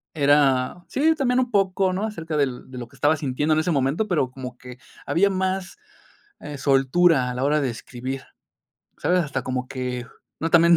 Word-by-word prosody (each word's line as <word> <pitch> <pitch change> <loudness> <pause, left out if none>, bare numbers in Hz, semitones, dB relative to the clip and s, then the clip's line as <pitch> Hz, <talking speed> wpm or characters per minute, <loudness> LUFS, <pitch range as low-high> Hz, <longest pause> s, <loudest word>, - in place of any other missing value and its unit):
Era, 145 +1 +3
sí, 315 +4 +2
también 255 -3 +1
un 250 -1 0
poco, 190 -1 +2
¿no?, 195 +3 -2
acerca 165 -7 -5
del 130 -4 -1
de 125 - -8
lo 120 - -6
que - - -20
estaba 150 +2 +3
sintiendo 150 +2 0
en 155 - +3
ese 160 - 0
momento, 140 +9 +1
pero 150 -9 0
como 130 -2 -8
que 125 0 -11 0.3
había 200 +4 +3
más, 190 - -2 0.6
eh, 145 -1 -7
soltura 135 +1 +3
a - - -4
la 130 - -2
hora 150 +2 +3
de 135 -3 0
escribir, 130 +3 -6 0.8
¿sabes? 180 0 +2
Hasta 150 -3 -2
como 130 0 -3
que 125 -2 -4 0.3
no 165 +1 -2
también, 170 +1 +6
150 Hz, 190 wpm, -23 LUFS, 130-180 Hz, 0.8 s, también